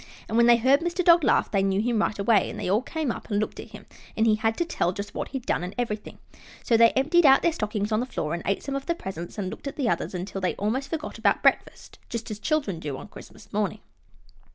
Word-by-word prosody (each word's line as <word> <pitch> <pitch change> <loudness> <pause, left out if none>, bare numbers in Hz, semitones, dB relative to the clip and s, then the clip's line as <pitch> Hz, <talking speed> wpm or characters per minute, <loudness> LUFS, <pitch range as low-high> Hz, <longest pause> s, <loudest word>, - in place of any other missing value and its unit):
And 220 - -4
when 235 0 +5
they 240 -1 +7
heard 260 +4 +4
Mr. 345 +2 -2
Dog 340 -1 +6
laugh - - +2
they 195 - +2
knew 195 0 +1
him 225 0 +1
right 215 - -1
away, 200 0 +3
and - - -7
they - - -3
all 200 +5 +2
came 305 0 -3
up - - -8
and 205 -2 +1
looked 215 - -3
at - - -9
him, - - -12 0.3
and 220 - +3
he 220 - +4
had 220 +1 0
to 345 - 0
tell 180 - -1
just 200 +2 -6
what - - -4
he'd 265 -3 -6
done - - 0
and 180 +2 -6
everything; 220 -4 -4 0.5
so 235 - +2
they 230 0 +7
emptied 310 +6 +3
out 270 -2 +6
their 340 - +3
stockings 210 -4 -2
on 215 - +2
the 250 - -2
floor 155 -10 -3
and 170 - -3
ate 195 - 0
some 275 - -4
of 275 0 -5
the 340 - 0
presents 180 - -7
and 190 -3 -3
looked - - -8
at 280 - -5
the 270 -5 -1
others, 210 - -1
until 190 +2 -5
they 185 - 0
almost 250 +7 -2
forgot 320 -1 -5
about - - +2
breakfast, - - 0
just 230 -1 -5
as 210 - -5
children 245 - -1
do 145 -4 -5
on 210 - -10
Christmas 210 +1 -14
morning. 210 0 -1
220 Hz, 270 wpm, -25 LUFS, 200-270 Hz, 0.5 s, they